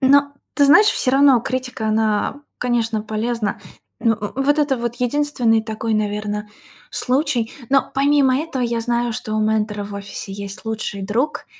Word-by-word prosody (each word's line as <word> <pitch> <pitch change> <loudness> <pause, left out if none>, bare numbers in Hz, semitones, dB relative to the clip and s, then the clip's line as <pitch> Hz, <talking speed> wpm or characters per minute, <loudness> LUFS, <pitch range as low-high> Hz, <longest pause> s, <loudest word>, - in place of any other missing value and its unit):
Но, 285 +1 +4 0.2
ты 285 - +4
знаешь, 340 +9 +7
всё 260 - +2
равно 270 -3 +5
критика, 250 -3 -3
она, 215 -1 +1
э, 285 - -15 0.2
конечно, 230 -3 0
полезна. 220 0 -2 0.4
Но 225 -2 +2
в 210 +6 -4
вот 290 +2 +2
это 290 -3 +2
вот 235 0 -3
единственный 245 -4 +1
такой, 220 0 -3
наверно, 210 0 -2 0.4
случай. 255 -3 0 0.2
Но 275 0 +3
помимо 275 -1 +3
этого, 290 -4 -3
я 235 -1 0
знаю, 235 0 0
что 225 -2 -4
у 215 - +1
ментора 215 -1 0
в 205 - -8
офисе 200 0 -6
есть 200 +1 -7
лучший 215 -3 -4
друг, 240 +10 -1
235 Hz, 165 wpm, -20 LUFS, 215-270 Hz, 0.4 s, знаешь